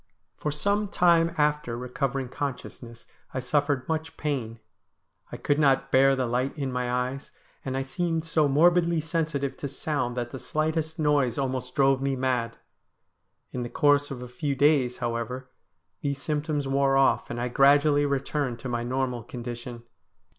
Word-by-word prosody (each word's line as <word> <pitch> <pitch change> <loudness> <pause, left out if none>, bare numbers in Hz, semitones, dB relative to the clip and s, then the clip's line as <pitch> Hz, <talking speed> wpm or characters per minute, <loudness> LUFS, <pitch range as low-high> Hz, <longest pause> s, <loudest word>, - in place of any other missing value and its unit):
For 150 - -3
some 200 +8 +1
time 170 -3 +3
after 150 -5 +1
re 125 +1 -6
covering 135 0 -2
consciousness 125 -3 -6 0.3
I - - 0
suffered 140 0 0
much 160 0 -3
pain; 125 -7 -3 0.7
I - - -5
could 145 +1 0
not 135 -2 +3
bear 135 +1 +5
the 130 -1 0
light 125 +5 -1
in 135 -3 -2
my 125 -1 -2
eyes; 125 +2 -2 0.3
and 130 0 -3
I 135 - -1
seemed 165 +3 -2
so 155 -2 +2
morbidly 170 +3 +4
sensitive 155 -3 -2
to 140 - -4
sound 130 -3 -2
that 120 -1 -3
the 130 - -6
slightest 160 +2 -2
noise 145 -6 +2
almost 130 -2 -3
drove 135 -1 +3
me 135 0 0
mad. 125 -3 -1 0.9
In 125 - -4
the 120 - -4
course 145 0 +3
of 125 -2 -6
a - - -7
few 140 +3 -3
days, 135 -3 +3
however, 120 +2 -4 0.5
these 140 -1 -2
symptoms 150 -1 -2
wore 135 0 +2
off, 135 - +3
and 120 - -4
I 125 +1 -1
gradually 145 +2 +4
returned 140 -2 -1
to 130 - -5
my 120 -1 -1
normal 125 0 -2
condition. 120 0 -7
135 Hz, 165 wpm, -26 LUFS, 125-150 Hz, 0.9 s, bear